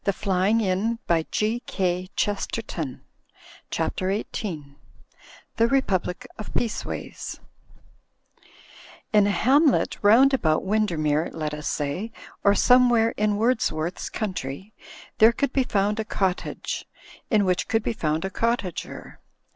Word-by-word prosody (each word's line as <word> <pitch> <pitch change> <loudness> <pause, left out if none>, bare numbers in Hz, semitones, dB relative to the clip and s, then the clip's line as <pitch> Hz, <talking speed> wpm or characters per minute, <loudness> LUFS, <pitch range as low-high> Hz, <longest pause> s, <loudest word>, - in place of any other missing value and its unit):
Digitized 200 +2 +1
by 170 -1 +2
CjOOQ 190 -3 -1
IC - - -19
CHAPTER 190 - -4
XVIII 170 -8 -4 0.8
THE 230 - +4
REPUBLIC 235 -4 0
OF 215 - -7
PEACEWAYS 230 -2 -4 1.7
In 205 -1 +5
a - - +2
hamlet 265 - +3
round 240 +7 +6
about 155 -12 +2
Windermere, 165 -7 +1
let 155 -2 -3
us 150 0 -5
say, 155 +10 -2 0.3
or 200 0 +5
somewhere 240 -2 +5
in 210 -1 0
Wordsworth's 205 -8 0
country, 190 - -5 0.5
there 220 +2 +8
could 270 +3 -1
be 270 - +3
found 210 -2 0
a - - 0
cottage, 190 -3 -2 0.4
in 210 -3 +3
which 180 -1 0
could 225 -1 +1
be 230 - -1
found 160 -4 -1
a 190 - -3
cottager. 230 -5 -3
205 Hz, 115 wpm, -25 LUFS, 175-225 Hz, 1.7 s, there